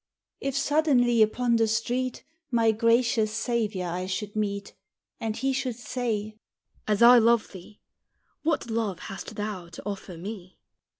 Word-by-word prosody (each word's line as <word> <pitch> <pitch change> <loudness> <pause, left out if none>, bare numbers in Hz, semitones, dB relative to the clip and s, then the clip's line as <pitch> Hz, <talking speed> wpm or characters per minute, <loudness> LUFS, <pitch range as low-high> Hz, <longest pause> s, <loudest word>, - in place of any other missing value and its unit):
If 275 0 -2
suddenly 275 -6 +3
upon 235 +2 +3
the 225 0 +3
street 240 +3 -1 0.3
My 230 -3 +3
gracious 230 0 +2
Saviour 215 -5 -1
I 180 +2 -3
should 205 +2 -4
meet, 200 -2 -2 0.5
And 220 -1 -3
he 270 +2 0
should 255 -3 -2
say, 220 -3 -3 0.5
"As 210 +1 +3
I 245 +1 +9
love 235 0 +3
thee, 195 +2 -13 0.6
What 310 -7 -1
love 220 -5 -1
hast 195 - -8
thou 205 -5 -5
to 170 - -11
offer 195 -4 -6
me?" 185 0 -8
225 Hz, 140 wpm, -27 LUFS, 205-240 Hz, 0.6 s, I